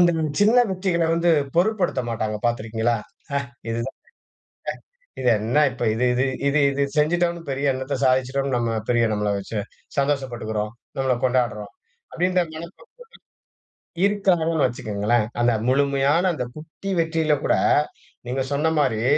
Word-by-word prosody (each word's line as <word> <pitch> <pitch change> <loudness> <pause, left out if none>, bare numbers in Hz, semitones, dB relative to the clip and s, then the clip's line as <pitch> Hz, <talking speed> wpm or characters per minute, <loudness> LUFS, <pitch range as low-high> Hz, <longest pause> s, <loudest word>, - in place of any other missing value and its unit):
இந்த 175 -1 +5 0.3
சின்ன 225 +4 +5
வெற்றிகள 180 -3 0
வந்து 170 0 +3 0.3
பொருட்படுத்த 190 -7 +1
மாட்டாங்க. 110 -1 -2
பார்த்திருக்கீங்களா? 115 0 0 0.3
"ஹ - - -1 0.4
இதுதா 115 +1 -3
ஹ - - -93 1.2
இது 125 - +1
என்ன 115 +7 +1
இப்ப! 120 - -4
இது 125 +3 0
இது 125 +2 +1 0.2
இது 145 +1 +3
இது 140 +1 -1 0.2
செஞ்சுட்டோம்னு, 170 +2 +1
பெரிய 135 +1 -1
என்னத்த 130 +1 -3
சாதிச்சுட்டோம்னு, 130 +1 +1
நம்ம 115 -1 0 0.2
பெரிய 120 -1 +3
நம்மள 105 0 -1
வைச்சு 100 +2 -4 0.4
சந்தோஷப்பட்டுக்கிறோம்? 120 -7 -1 0.3
நம்மளை 130 -1 +2
கொண்டாடுறோம்." 120 -5 0 0.4
அப்படின்ற 180 +1 +2
மனப்பக்குவ 170 - -10 1.2
இருக்காங்கன்னு 175 -6 +2
வைச்சுகோங்களேன். 110 -1 0 0.2
அந்த 120 0 +4 0.2
முழுமையான, 140 +4 +2
அந்த 125 -5 -3
குட்டி 160 +5 -7
வெற்றியில 160 -2 +2
கூட, - - +3 0.7
நீங்க 130 +1 -1
சொன்ன 150 +3 +1
மாரி 115 -6 +1
135 Hz, 130 wpm, -23 LUFS, 120-165 Hz, 1.2 s, இந்த